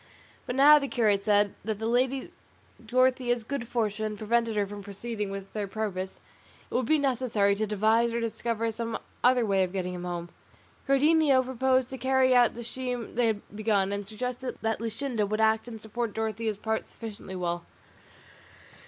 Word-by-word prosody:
But 245 - -2
now, 295 +3 +8
the 280 - -3
curate 210 -6 +2
said, 205 -1 +3
that 215 0 -2
the 220 - -4
lady 255 +3 0 0.5
Dorothea's 250 0 +2
good 245 0 -4
fortune 215 -2 -1
prevented 230 +1 0
her 205 -1 +2
from 205 +1 -8
proceeding 205 +1 -5
with 195 0 -7
their 210 -2 -2
purpose, 190 -2 -4 0.5
it - - -8
would 250 -2 0
be 315 - +4
necessary 245 -7 +1
to 215 +2 -1
devise 220 +3 +2
or 235 - -1
discover 230 0 -2
some 230 0 -3 0.3
other 250 -1 +4
way 195 -2 +2
of 180 - -2
getting 180 -2 -2
him 180 0 -6
home. 175 -1 -4 0.6
Cardenio 280 -1 +4
proposed 260 0 +1
to 265 - -6
carry 260 0 +3
out 245 -1 +5
the 235 - -6
scheme 245 -1 -4
they 240 -1 +2
had 210 -1 -3
begun, 205 -2 +1
and 200 -1 -4
suggested 250 +4 -4
that 225 0 0
Luscinda 230 -1 -2
would 215 +2 -2
act 220 +1 +2
and 225 -2 -7
support 220 +1 -4
Dorothea's 220 -1 -2
part 220 +1 -2
sufficiently 210 -4 -8
well. 175 -1 -2
225 Hz, 175 wpm, -28 LUFS, 205-250 Hz, 0.6 s, now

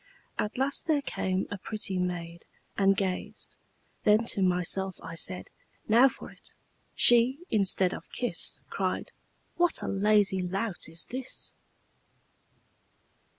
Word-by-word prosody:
At 210 +3 -2
last 270 +5 0
there 300 -3 +2
came 190 -6 -1
a 205 - -4
pretty 195 -2 -3
maid, 170 -1 -4 0.3
And 195 0 +3
gazed; 190 -2 -4 0.5
then 215 +2 +4
to 195 - -1
myself 185 +1 +1
I 165 - -7
said, 180 +2 -2 0.4
'Now 235 +5 +7
for - - -10
it!' - - -7 0.4
She, 240 +2 +7
instead 195 -3 +3
of - - -9
kiss, 245 - -2
Cried, - - -2 0.5
'What 345 -1 +2
a - - -3
lazy 200 -1 +3
lout 190 0 -3
is 165 0 -4
this!' 255 +1 -6
195 Hz, 125 wpm, -28 LUFS, 180-230 Hz, 0.5 s, Now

